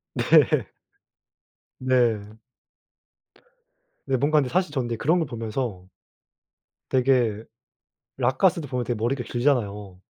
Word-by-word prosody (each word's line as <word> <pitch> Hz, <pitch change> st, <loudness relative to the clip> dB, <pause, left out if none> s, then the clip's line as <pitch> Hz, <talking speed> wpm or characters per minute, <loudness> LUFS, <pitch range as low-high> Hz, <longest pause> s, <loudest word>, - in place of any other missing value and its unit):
네. -, -, +4 dB, 1.1 s
네. 115 Hz, -5 st, 0 dB, 1.7 s
근데 130 Hz, -1 st, 0 dB
뭔가 150 Hz, +4 st, +2 dB
근데 135 Hz, -4 st, +2 dB
사실 180 Hz, +1 st, 0 dB
저는 120 Hz, -5 st, -2 dB
그런 160 Hz, +10 st, +2 dB
걸 165 Hz, -, 0 dB
보면서 115 Hz, -4 st, -4 dB, 1.1 s
되게 125 Hz, -5 st, +2 dB, 0.7 s
록가수도 145 Hz, +5 st, +1 dB
보면 125 Hz, -2 st, -2 dB
되게 120 Hz, -, -2 dB
머리가 120 Hz, +4 st, -1 dB
길잖아요. 105 Hz, -7 st, -1 dB
125 Hz, 210 characters per minute, -24 LUFS, 110-135 Hz, 1.7 s, 네